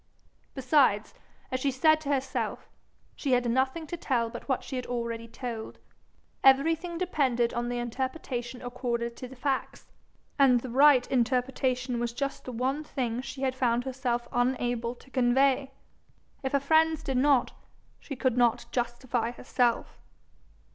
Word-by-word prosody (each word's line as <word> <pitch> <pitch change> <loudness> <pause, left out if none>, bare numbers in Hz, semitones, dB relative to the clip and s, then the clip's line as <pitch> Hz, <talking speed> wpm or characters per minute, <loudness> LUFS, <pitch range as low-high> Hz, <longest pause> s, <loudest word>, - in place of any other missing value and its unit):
Besides, 255 -6 +3 0.4
as 255 - -1
she 275 - +1
said 310 +4 +3
to 290 - -5
herself, 270 -2 -2 0.5
she 275 -3 -1
had 245 -1 +2
nothing 260 +6 0
to 330 - -5
tell 240 -8 -1
but - - -9
what 260 - 0
she 265 - -6
had 250 - -4
already 235 -1 -3
told; 230 -1 -6 0.7
everything 325 +6 +4
depended 265 -10 +1
on 240 0 -2
the 245 - -2
interpretation 245 0 -4
accorded 240 -1 -3
to 255 - -7
the 265 - -12
facts, 265 +1 -3 0.5
and 255 -3 +5
the 255 - -6
right 270 -1 +6
interpretation 250 0 0
was 235 0 -2
just 275 +2 -4
the 255 - -5
one 260 +5 -1
thing 250 -5 -3
she 270 +1 -7
had 260 -1 +1
found 245 -2 +1
herself 250 -2 -2
unable 245 -1 0
to 265 - -20
convey. 265 +2 +3 0.7
If 265 -1 -3
her 280 - +4
friends 315 +2 +3
did 265 -2 -1
not, 275 -1 +3 0.5
she 280 - -7
could 255 -1 0
not 240 -1 +3
justify 240 -1 -1
herself. 245 -1 -1
255 Hz, 150 wpm, -28 LUFS, 240-275 Hz, 0.7 s, right